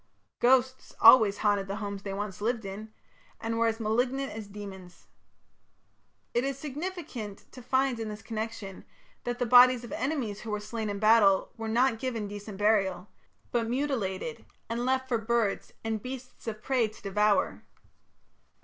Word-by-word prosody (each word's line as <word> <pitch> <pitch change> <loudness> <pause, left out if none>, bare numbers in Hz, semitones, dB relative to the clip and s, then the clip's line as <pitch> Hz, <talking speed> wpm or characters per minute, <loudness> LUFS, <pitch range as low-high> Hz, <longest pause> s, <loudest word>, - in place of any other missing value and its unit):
Ghosts 260 +1 +2
always 220 -4 +8
haunted 205 -2 +1
the 195 - -3
homes 200 -2 -5
they 195 - -5
once 205 -1 -5
lived 225 0 -1
in, 210 +3 -7 0.5
and 230 0 -2
were 230 - +3
as 225 0 -1
malignant 245 +5 0
as 215 -1 -7
demons. 195 -3 -10 1.3
It 240 - +2
is 275 -1 -2
significant 290 - -6
to 255 - -11
find 260 0 +1
in 225 -1 -3
this 210 0 -8
connection 220 -3 -5 0.4
that 245 0 -2
the 245 - 0
bodies 250 +1 +7
of 240 - -9
enemies 250 -6 -2
who 225 - -7
were 210 0 -1
slain 215 +1 -4
in 200 - -3
battle 215 -2 +4
were 225 0 -5
not 235 0 +2
given 230 -5 -3
decent 205 0 -8
burial, 195 -3 +1 0.4
but 230 -2 0
mutilated 235 -4 -2 0.2
and 235 +1 -2
left 260 0 +1
for 240 -3 0
birds 225 -2 0
and 220 -1 -2
beasts 255 0 -8
of 215 -1 -5
prey 255 -4 +2
to 215 - -14
devour. 210 +1 +1
225 Hz, 160 wpm, -29 LUFS, 205-250 Hz, 1.3 s, always